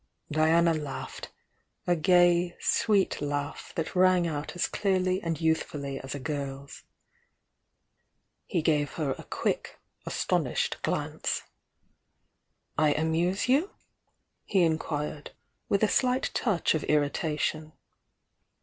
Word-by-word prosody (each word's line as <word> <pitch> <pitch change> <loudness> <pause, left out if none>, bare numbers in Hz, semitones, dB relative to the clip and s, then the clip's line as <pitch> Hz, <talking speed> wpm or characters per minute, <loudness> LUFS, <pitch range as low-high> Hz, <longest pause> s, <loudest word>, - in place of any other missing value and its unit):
Diana 165 +2 +4
laughed 150 -3 -6 0.3
— - - -48
a 175 - +3
gay, 175 +1 +4
sweet 205 -7 +2
laugh 145 0 -3
that 165 +3 -3
rang 185 -1 +4
out 150 0 -4
as 175 - +1
clearly 185 -1 0
and 165 -4 -2
youthfully 145 -4 -1
as 135 +1 -6
a - - -5
girl's. 140 -1 -5 1.7
He 170 -6 0
gave 150 -3 +1
her 150 -4 -1
a - - -8
quick, - - -3 0.3
astonished - - 0
glance. - - -2 1.4
"I 155 -1 +4
amuse 165 +6 0
you?" 285 +10 +2 0.7
he 190 -3 +2
inquired, 155 -2 -2 0.4
with 200 +1 +2
a - - +6
slight 255 +3 +1
touch 205 -8 +1
of 160 - -1
irritation. 150 +1 0
160 Hz, 115 wpm, -28 LUFS, 150-180 Hz, 1.7 s, a